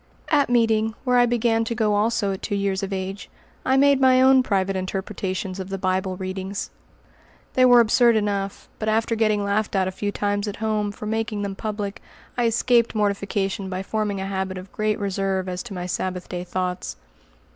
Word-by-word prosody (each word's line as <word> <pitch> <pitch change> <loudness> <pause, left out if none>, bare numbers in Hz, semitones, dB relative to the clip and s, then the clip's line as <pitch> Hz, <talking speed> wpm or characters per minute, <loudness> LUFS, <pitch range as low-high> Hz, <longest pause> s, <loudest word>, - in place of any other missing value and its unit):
At 290 -4 +3
meeting, 225 -2 +2
where 250 -2 +3
I 245 - +5
began 230 -1 +2
to 230 +1 -3
go 215 -3 +1
also 210 0 +1
at 190 - -7
two 205 - -2
years 200 -1 0
of 195 0 -4
age, 195 +1 -4 0.3
I 265 +1 +2
made 280 0 +4
my 260 -1 +6
own 260 0 +6
private 195 -5 0
interpretations 190 0 -3
of 190 0 -5
the 195 - -3
Bible 185 0 -1
readings. 190 +1 -4 0.8
They 255 - +5
were 245 -1 +7
absurd 235 +1 +5
enough, 200 -2 -2
but 215 - -1
after 225 +1 +1
getting 215 -2 +2
laughed 200 +1 0
at 190 -1 +2
a - - -2
few 205 +2 -3
times 205 0 -1
at 205 - -4
home 215 -2 -1
for 210 - -9
making 220 -1 -2
them 200 -1 -3
public, 205 -1 -4 0.3
I 245 - +1
escaped 235 0 +2
mortification 200 -1 -1
by 185 0 -3
forming 210 -1 -2
a 190 - -3
habit 190 -1 -3
of 185 +1 -9
great 215 0 0
reserve 195 -1 -1
as 180 0 -3
to 240 - -8
my 180 0 -4
Sabbath 180 0 -3
day 180 -1 -5
thoughts. 180 0 -3
205 Hz, 195 wpm, -23 LUFS, 190-225 Hz, 0.8 s, were